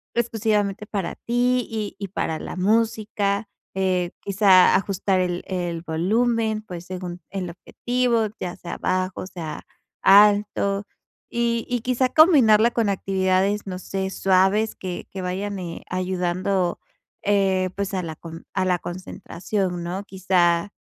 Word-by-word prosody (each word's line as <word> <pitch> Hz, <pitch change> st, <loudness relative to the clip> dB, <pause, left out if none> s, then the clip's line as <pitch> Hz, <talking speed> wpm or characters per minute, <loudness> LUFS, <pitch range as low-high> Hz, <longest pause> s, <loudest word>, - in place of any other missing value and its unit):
exclusivamente 210 Hz, -3 st, 0 dB
para 195 Hz, -5 st, -3 dB
ti 245 Hz, +1 st, 0 dB
y 215 Hz, -3 st, -4 dB
y 200 Hz, -, -4 dB
para 160 Hz, -4 st, -2 dB
la -, -, -6 dB
música. 210 Hz, 0 st, 0 dB, 0.3 s
Eh, 185 Hz, -2 st, 0 dB
quizá, 195 Hz, -2 st, +5 dB
ajustar 195 Hz, 0 st, +1 dB
el 175 Hz, -1 st, -2 dB
el 175 Hz, -3 st, -3 dB
volumen, 220 Hz, +6 st, 0 dB
pues, 180 Hz, -4 st, -8 dB
según 180 Hz, -1 st, -6 dB
el 185 Hz, -2 st, -4 dB
objetivo, 240 Hz, +5 st, 0 dB
ya 180 Hz, -1 st, -4 dB
sea 175 Hz, -, -7 dB
bajo, 185 Hz, 0 st, -1 dB
sea 165 Hz, -5 st, -6 dB, 0.4 s
alto 205 Hz, 0 st, +4 dB, 0.4 s
y 235 Hz, -1 st, 0 dB
y 245 Hz, -1 st, -1 dB
quizá 255 Hz, +1 st, +1 dB
combinarla 240 Hz, -9 st, +6 dB
con 230 Hz, -3 st, +1 dB
actividades, 195 Hz, +1 st, 0 dB
no 185 Hz, -1 st, -4 dB
sé, 190 Hz, 0 st, -3 dB
suaves 195 Hz, +4 st, +2 dB
que 180 Hz, -2 st, -6 dB
que 190 Hz, -, -5 dB
vayan, 190 Hz, +2 st, -3 dB
eh, 170 Hz, -2 st, -6 dB
ayudando, 185 Hz, 0 st, -1 dB, 0.4 s
eh, 195 Hz, -2 st, +2 dB
pues, 200 Hz, 0 st, -3 dB
a 185 Hz, -, 0 dB
la 160 Hz, -2 st, -5 dB
con 165 Hz, +1 st, -10 dB
a 190 Hz, -1 st, 0 dB
la 180 Hz, -1 st, +1 dB
concentración, 180 Hz, +1 st, -4 dB
¿no? 185 Hz, +3 st, -4 dB
Quizá, 185 Hz, -1 st, +1 dB
195 Hz, 135 wpm, -23 LUFS, 180-215 Hz, 0.4 s, combinarla